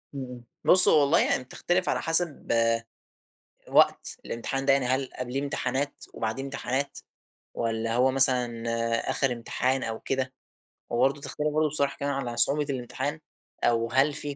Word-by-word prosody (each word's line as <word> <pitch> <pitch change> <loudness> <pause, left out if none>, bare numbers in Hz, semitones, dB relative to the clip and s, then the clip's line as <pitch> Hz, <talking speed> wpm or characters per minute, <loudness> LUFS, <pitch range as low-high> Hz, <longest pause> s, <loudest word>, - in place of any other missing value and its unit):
إمم. 125 -3 -7 0.2
بُص 185 0 +6
هو 155 - +6
والله 140 +3 +4
يعني - - +1
بتختلف 175 +7 -1
على - - 0
حسب 165 -2 +2 1.2
وقت - - +3
الإمتحان 135 +4 -3
ده، 135 - +6
يعني 135 -2 +2
هل 130 +1 0
قبليه 125 +2 -3
امتحانات 140 0 -2
وبعديه 110 +4 -3
امتحانات، 140 0 -3 0.6
والّا 115 0 -1
هو 125 +2 +4
مثلًا 125 -3 +3 0.5
آخر 135 -3 +1
امتحان 130 +3 -1
أو 110 -1 -4
كده، 130 -1 -2 0.6
وبرضو 135 +4 +1
تختلف 150 +1 -3
برضو 155 0 +2
بصراحة 140 -1 -1
كمان 140 0 -2
على 125 -3 -4
صعوبة 145 +4 +3
الامتحان 135 +3 -3 0.4
أو 115 -1 +2
هل 135 +3 +3
فيه 145 -1 -5
135 Hz, 145 wpm, -27 LUFS, 125-140 Hz, 1.2 s, بُص